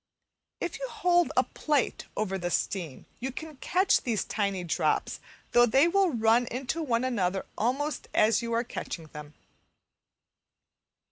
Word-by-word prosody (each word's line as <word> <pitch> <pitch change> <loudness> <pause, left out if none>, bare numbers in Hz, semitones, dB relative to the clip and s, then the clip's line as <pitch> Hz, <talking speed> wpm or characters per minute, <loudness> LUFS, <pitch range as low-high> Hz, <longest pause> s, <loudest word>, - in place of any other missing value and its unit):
If - - -4
you - - -3
hold 350 -4 +2
a - - +6
plate 295 -5 -1
over 195 -2 -1
the 175 0 -2
steam 170 -6 -2
you 260 +3 -3
can 310 +2 -8
catch 370 +7 +2
these 230 -4 -1
tiny 200 -3 -2
drops, 170 - 0 0.3
though 240 0 +6
they 270 +7 +5
will 385 +1 +3
run 235 -2 +3
into 265 +7 -3
one 240 -5 0
another 195 -7 0
almost 275 +7 -1
as 215 +1 +3
you 235 0 -4
are 230 +1 +1
catching 170 -8 -6
them. 150 0 -10
235 Hz, 145 wpm, -28 LUFS, 200-290 Hz, 0.3 s, a